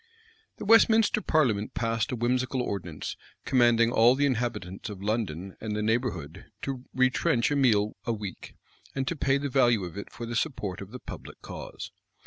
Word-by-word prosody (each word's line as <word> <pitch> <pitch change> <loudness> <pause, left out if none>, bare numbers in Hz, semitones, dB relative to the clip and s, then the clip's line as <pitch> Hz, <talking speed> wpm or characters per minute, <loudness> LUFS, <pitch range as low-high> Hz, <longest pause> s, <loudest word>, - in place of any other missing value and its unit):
The - - -6
Westminster 225 0 +5
parliament 120 - +1
passed 115 0 0
a - - -1
whimsical 125 +2 0
ordinance, 85 -8 -4 0.3
commanding 120 -2 +4
all 120 +2 +5
the 145 +1 +2
inhabitants 115 -7 -2
of 100 -2 -8
London 100 -4 -2
and 110 -1 -3
the 105 - -1
neighborhood 105 - -2 0.2
to 135 -2 -4
retrench 130 -1 +2
a - - +2
meal 110 -6 +3
a - - 0
week, 105 -5 -6 0.4
and 135 -1 -1
to 170 - -1
pay 140 -2 +2
the 140 +1 -2
value 120 -6 +3
of 90 +1 -7
it - - -9
for 120 - -7
the 120 +1 -5
support 105 - -2
of 100 - -8
the 125 - -7
public - - -10
cause. - - -8
115 Hz, 175 wpm, -28 LUFS, 105-130 Hz, 0.4 s, Westminster